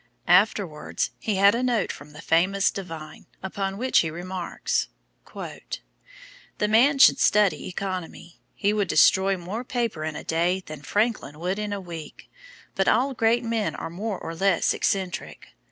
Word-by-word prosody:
Afterwards 180 -3 +2
he 215 - -1
had 200 +1 +6
a 235 - 0
note 240 -5 +1
from 140 +2 -11
the 150 +2 -12
famous 190 +4 +2
divine 165 -5 -8 0.2
upon 195 0 -3
which 255 +3 +3
he 160 - +1
remarks: 180 +2 -3 0.5
"The - - -8
man 245 +7 +4
should 270 - +7
study 210 -2 +3
economy; 185 -2 -6
he 205 0 +1
would 205 -2 0
destroy 190 +4 +4
more 190 +7 -5
paper 235 -10 -2
in 155 -1 -3
a - - -6
day 175 +3 0
than 155 -2 -8
Franklin 205 - -1
would 185 +4 -2
in 210 -1 -3
a 200 - -2
week; 170 -4 -10 0.4
but 195 - 0
all 265 +5 +3
great 235 0 +2
men 230 -2 -1
are - - -6
more 200 +3 -3
or 165 - -6
less 190 +1 +2
eccentric. 190 -3 -2
195 Hz, 155 wpm, -25 LUFS, 170-220 Hz, 0.5 s, should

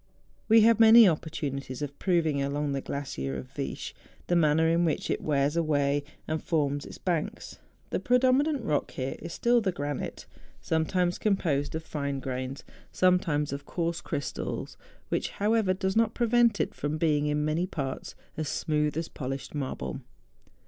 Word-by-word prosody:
We 225 0 +7
had 230 0 +5
many 225 0 +9
opportunities 145 -5 -2
of 145 0 -6
proving, 165 -6 +1
along 145 +1 -1
the 140 -1 -2
glacier 70 - -4
of 65 -1 -9
Viesch, - - -5 0.3
the 175 - +1
manner 160 -1 +4
in 165 +1 +3
which 160 -3 0
it - - -1
wears 145 0 +1
away 145 -3 +1 0.2
and 155 0 -2
forms 145 -3 0
its - - -10
banks. 170 -4 -3 0.3
The - - 0
predominant 260 +3 +2
rock 150 -8 0
is - - -17
here 135 +6 -4
still 235 +7 +2
the 195 -3 0
granite, 145 -4 -4 0.3
sometimes 175 +2 0
composed 160 -9 0
of 160 - -3
fine 140 -3 -3
grains, 130 +1 -4 0.3
sometimes 165 -6 +2
of 140 0 -6
coarse 170 -1 -2
crystals; 140 - -4 0.3
which, - - -1
how¬ 210 +3 +1
ever, 195 -5 +2
does 190 +1 -1
not 225 0 +2
prevent 235 -2 +3
it - - 0
from 145 +1 -3
being 150 -2 +2
in 150 0 0
many 160 +4 0
parts 135 -7 -5 0.2
as 155 -2 -2
smooth 150 -1 0
as 165 0 -2
polished 135 0 -5
marble. 130 - -4
155 Hz, 165 wpm, -28 LUFS, 140-185 Hz, 0.3 s, many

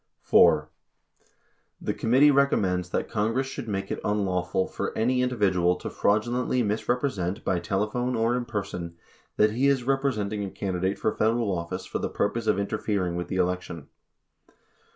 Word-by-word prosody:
4. 75 -1 +5 1.1
The - - -2
committee 130 +6 +4
recommends 95 -11 +2
that - - -1
Congress 115 +4 0
should 135 -3 -6
make 95 -2 -3
it - - -2
unlawful 95 -3 0
for - - -4
any 125 +3 +2
individual 95 -8 +2
to - - -7
fraudulently 120 +4 +1
misrepresent 105 -3 -1
by 90 - +1
telephone 105 +6 -1
or 115 +1 +1
in 125 -1 -2
person 95 -6 -5 0.4
that 105 0 +4
he 125 +5 +1
is 135 -3 +2
representing 120 -6 -1
a 100 - -4
candidate 95 0 -2
for 110 - -1
Federal 110 -2 +1
office 85 +2 -5
for - - -4
the - - -2
purpose 110 +2 -1
of 105 - +3
interfering 100 -3 -1
with 90 0 -3
the - - -4
election. 90 -4 -2
105 Hz, 150 wpm, -26 LUFS, 90-120 Hz, 1.1 s, 4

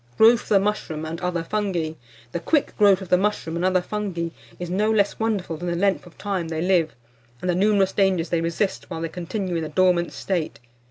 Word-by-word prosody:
GROWTH 230 +1 +6
OF - - -14
THE 200 - +5
MUSHROOM 190 -6 -2
AND 165 +2 -5
OTHER 180 -2 -1
FUNGI. 175 -5 -2 0.4
The 170 - -2
quick 295 - +1
growth 200 -2 +4
of 185 - -11
the 180 - +4
mushroom 195 -5 -1
and 170 - -2
other 185 -1 +2
fungi 185 -5 -3 0.3
is 175 -1 -5
no 210 +4 +1
less 205 -2 +2
wonderful 205 -7 -1
than 175 +3 -5
the 170 - 0
length 185 -2 +1
of 175 - -17
time 195 -5 -2
they 160 -1 -3
live, 170 -5 +2 0.4
and 180 - -4
the 180 - +2
numerous 195 +1 +3
dangers 190 -4 +1
they 170 -1 +1
resist 170 +4 -2
while 165 -2 -5
they 165 - -2
continue 180 +2 -3
in - - -1
the 155 - -4
dormant 175 +1 +2
state. 175 -5 -3
180 Hz, 220 wpm, -23 LUFS, 170-200 Hz, 0.4 s, GROWTH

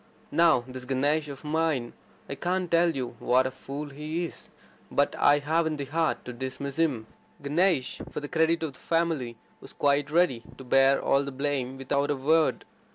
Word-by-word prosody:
Now, 165 -6 +4
this 130 -1 -8
Ganesh 145 +4 +1
of 140 0 -8
mine, 150 -5 0 0.3
I - - -4
can't 180 +4 -2
tell 170 +1 +4
you 125 -3 -4
what 130 +1 +3
a 130 - -1
fool 140 +3 -7
he 155 +4 -3
is, - - -8 0.4
but - - +1
I 145 0 +5
haven't 160 +2 0
the 140 - -4
heart 160 +3 -1
to 125 - -6
dismiss 130 +3 -5
him." 135 -9 +1 0.4
Ganesh, 155 -1 +1
for - - -5
the 145 - -6
credit 160 +2 +1
of 155 -4 -3
the - - -16
family, 160 -8 -1 0.2
was - - -12
quite 145 0 +1
ready 160 -7 +2 0.2
to - - -10
bear 135 +2 +4
all 140 +1 +2
the 140 - -5
blame 135 -1 -2
without 140 +2 -1
a 145 - +1
word. 155 +4 +2
145 Hz, 185 wpm, -27 LUFS, 135-160 Hz, 0.4 s, I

